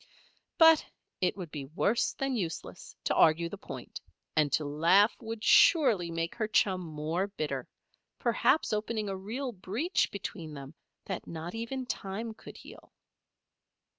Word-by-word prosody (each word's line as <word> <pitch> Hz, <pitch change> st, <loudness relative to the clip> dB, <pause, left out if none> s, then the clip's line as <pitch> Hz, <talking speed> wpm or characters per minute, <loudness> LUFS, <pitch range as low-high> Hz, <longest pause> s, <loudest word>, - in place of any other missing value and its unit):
But 325 Hz, -1 st, +7 dB, 0.4 s
it 185 Hz, +1 st, 0 dB
would 175 Hz, -5 st, -7 dB
be 145 Hz, -3 st, -5 dB
worse 190 Hz, -, 0 dB
than 270 Hz, -1 st, -2 dB
useless 175 Hz, -8 st, -5 dB
to -, -, +1 dB
argue 165 Hz, +1 st, +4 dB
the 205 Hz, -, -7 dB
point, -, -, -8 dB, 0.3 s
and 150 Hz, -2 st, +3 dB
to 155 Hz, -, +2 dB
laugh 170 Hz, +9 st, +4 dB
would 225 Hz, -1 st, -6 dB
surely 235 Hz, -, +5 dB
make 165 Hz, 0 st, -2 dB
her 220 Hz, -2 st, -2 dB
chum 190 Hz, -3 st, +2 dB
more 160 Hz, +3 st, -2 dB
bitter 150 Hz, -9 st, -4 dB, 0.5 s
perhaps 315 Hz, -, +2 dB
open 215 Hz, 0 st, -2 dB
a 195 Hz, -, -2 dB
real 235 Hz, +8 st, -4 dB
breach 225 Hz, -, -1 dB
between 170 Hz, -6 st, -6 dB
them 140 Hz, +1 st, -9 dB, 0.3 s
that 190 Hz, -, -5 dB
not 165 Hz, +1 st, -6 dB
even 235 Hz, +3 st, -4 dB
time 220 Hz, 0 st, -4 dB
could -, -, -12 dB
heal. -, -, -14 dB
195 Hz, 145 wpm, -30 LUFS, 165-225 Hz, 0.5 s, But